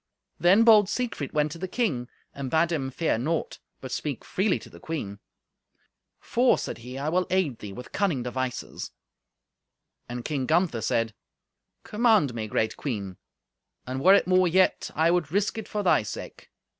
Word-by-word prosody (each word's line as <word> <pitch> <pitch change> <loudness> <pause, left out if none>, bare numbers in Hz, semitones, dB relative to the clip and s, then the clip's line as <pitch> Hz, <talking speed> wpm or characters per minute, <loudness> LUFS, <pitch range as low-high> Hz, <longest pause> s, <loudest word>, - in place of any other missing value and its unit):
Then 185 +7 +5
bold 215 -4 +6
Siegfried 230 - -3
went 150 -1 +1
to 165 - -8
the 185 - -3
king, 170 - -1 0.3
and 140 -2 -5
bade 165 +3 +2
him 135 -5 -1
fear 135 -3 0
naught, 160 +6 -2 0.2
but 130 - -7
speak 145 -4 -4
freely 190 0 +1
to - - -12
the - - -14
queen. 105 -12 -5 1.0
"For," 245 +1 +2
said 115 - -5
he, 125 +3 -8
"I 140 +2 -3
will 180 +3 +1
aid 175 -10 0
thee 105 - -7
with 125 +5 -9
cunning 170 - 0
devices." 125 0 -4 1.2
And 120 0 -5
King 140 -4 -2
Gunther 165 -8 +2
said, 115 -1 0 0.7
"Command 210 - +3
me, 110 -2 -4
great 110 +1 0
queen, 100 -9 -4 0.7
and 130 +1 -4
were 190 +3 +8
it - - +3
more 185 0 +4
yet, 185 +2 +2
I 160 +2 +3
would 170 -5 0
risk 205 +4 0
it 220 - -7
for 210 -1 -3
thy 185 - +4
sake. 105 - -8
155 Hz, 170 wpm, -26 LUFS, 125-185 Hz, 1.2 s, were